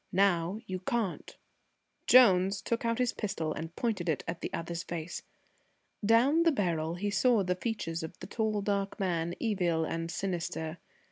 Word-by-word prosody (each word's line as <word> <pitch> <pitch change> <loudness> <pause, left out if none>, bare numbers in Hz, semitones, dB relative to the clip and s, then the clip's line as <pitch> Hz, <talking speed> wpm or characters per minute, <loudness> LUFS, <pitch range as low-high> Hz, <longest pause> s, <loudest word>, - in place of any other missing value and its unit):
Now 185 -1 +2
you 185 -3 -4
can't." 200 0 -3 0.7
Jones 195 -6 +6
took 235 - -1
his 235 +1 0
pistol 195 -7 -3
out - - -4
and 165 +1 -7
pointed 205 -8 -1
it 155 - 0
at 165 0 -4
the - - -4
other's 170 0 -3
face. 170 0 -5 0.8
Down 240 +9 +4
the 335 -1 +5
barrel 170 - -1
he 205 +3 -2
saw 225 0 +3
the 180 0 +1
features 180 -5 -3
of 160 - -7
the - - -8
tall 215 -2 -1
dark 200 -1 -1
man, 175 -3 -1
evil 180 -8 +1
and 165 +1 -3
sinister. 170 -2 -3
185 Hz, 160 wpm, -30 LUFS, 165-220 Hz, 0.8 s, Jones